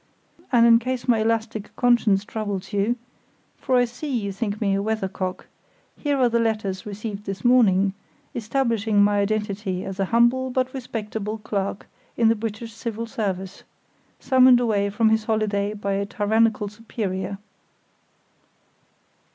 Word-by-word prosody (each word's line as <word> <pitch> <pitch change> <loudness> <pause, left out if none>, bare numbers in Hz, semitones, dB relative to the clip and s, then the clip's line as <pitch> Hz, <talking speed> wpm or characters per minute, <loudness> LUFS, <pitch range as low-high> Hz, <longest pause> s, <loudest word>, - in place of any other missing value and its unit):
And 235 -2 +5
in 230 -1 +7
case 250 +1 -3
my 235 -3 +4
elastic 220 -1 -2
conscience 230 -5 +3
troubles 205 -2 -4
you 205 +4 +1 0.6
(for 260 - 0
I 245 0 +5
see 245 +6 -7
you 220 -7 -1
think 205 +1 -3
me 200 -3 +1
a 195 - +1
weather 220 -1 -1
cock) 185 -1 -4 0.5
here 290 -2 -1
are 255 -2 +4
the 235 0 +1
letters 215 -4 -1
received 210 0 -6
this 195 +4 -5
morning, 200 -6 +4 0.4
establishing 225 -3 +1
my 205 0 +3
identity 200 -2 -2
as 195 0 -6
a 195 - +2
humble 240 +5 +3
but 255 0 -1
respectable 220 -4 -4
clerk 200 -2 -3 0.3
in 230 -1 +4
the 225 - +3
British 225 +1 -5
Civil 225 0 -4
Service, 195 -5 -4 0.6
summoned 255 -2 +6
away 210 -4 +1
from 220 +2 +2
his 220 0 +1
holiday 210 -2 0
by 200 -1 -3
a 200 0 -1
tyrannical 215 +1 +1
superior." 200 -3 -4
215 Hz, 145 wpm, -23 LUFS, 200-235 Hz, 0.6 s, in